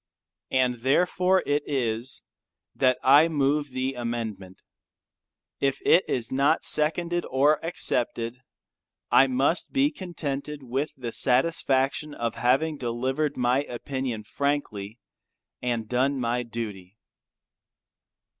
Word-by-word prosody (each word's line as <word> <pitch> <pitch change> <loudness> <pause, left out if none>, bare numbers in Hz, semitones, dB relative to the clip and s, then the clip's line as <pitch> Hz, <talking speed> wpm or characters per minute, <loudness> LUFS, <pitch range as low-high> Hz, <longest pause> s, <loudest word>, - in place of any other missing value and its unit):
And 125 -2 +1
therefore 180 +8 +2
it 145 +1 +1
is, 120 -3 -1 0.5
that 130 -1 +3
I 145 +5 +7
move 145 -1 0
the 130 +1 -2
amendment. 115 -6 -5 1.0
If 135 -1 +1
it 180 - +6
is 120 -3 -1
not 140 +4 +2
seconded 170 +3 +1
or 145 +3 +3
accepted 125 -7 -2 0.7
I 135 - +6
must 135 +6 +1
be 280 +2 +3
contented 150 - -5
with 135 +4 -2
the 120 -3 -5
satisfaction 135 +1 +1
of 115 -1 -2
having 145 +5 +1
delivered 130 +4 -2
my 125 +2 +2
opinion 125 -2 -4
frankly 115 -6 -3 0.6
and 120 -3 -2
done 130 +3 +1
my 120 0 0
duty. 110 -5 -7
130 Hz, 110 wpm, -26 LUFS, 120-145 Hz, 1.0 s, I